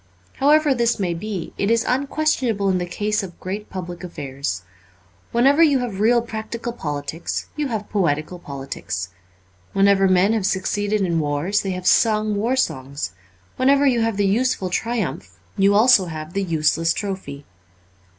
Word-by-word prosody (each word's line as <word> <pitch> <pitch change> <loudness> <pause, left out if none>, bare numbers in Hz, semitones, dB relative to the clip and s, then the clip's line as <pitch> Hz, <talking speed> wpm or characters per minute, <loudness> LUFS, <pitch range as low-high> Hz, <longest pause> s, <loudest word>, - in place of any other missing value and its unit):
However 295 +1 +4
this 235 -2 +1
may 180 -3 0
be, 190 +1 -5
it 200 - +1
is 230 0 +2
unquestionable 260 -6 0
in 185 -1 +1
the 175 - -3
case 210 +4 -1
of 185 -3 -9
great 200 +3 -5
public 180 -1 -7
affairs. 135 - -5 0.7
Whenever 275 +6 +4
you 295 -4 +5
have 240 -6 -3
real 235 +2 +3
practical 235 +1 -5
politics 150 -4 -4
you 300 -1 -1
have 220 -4 -4
poetical 175 -3 -1
politics. 135 - -5 0.6
When 195 0 +4
ever 195 -1 +4
men 185 +3 +4
have 210 -4 0
succeeded 205 +2 0
in 170 -3 +1
wars 150 +7 0
they 195 -1 -3
have 180 - -8
sung 215 0 +3
war 230 +6 0
songs; 135 - -2 0.5
whenever 275 +2 +4
you 245 -4 +3
have 225 -2 0
the 205 - +2
useful 200 -2 +1
triumph 160 - -3 0.2
you 195 +1 +4
have 205 - +6
also 225 -6 +5
the 160 +4 -4
useless 165 -1 +1
trophy. 190 -9 -5
200 Hz, 160 wpm, -22 LUFS, 170-230 Hz, 0.7 s, have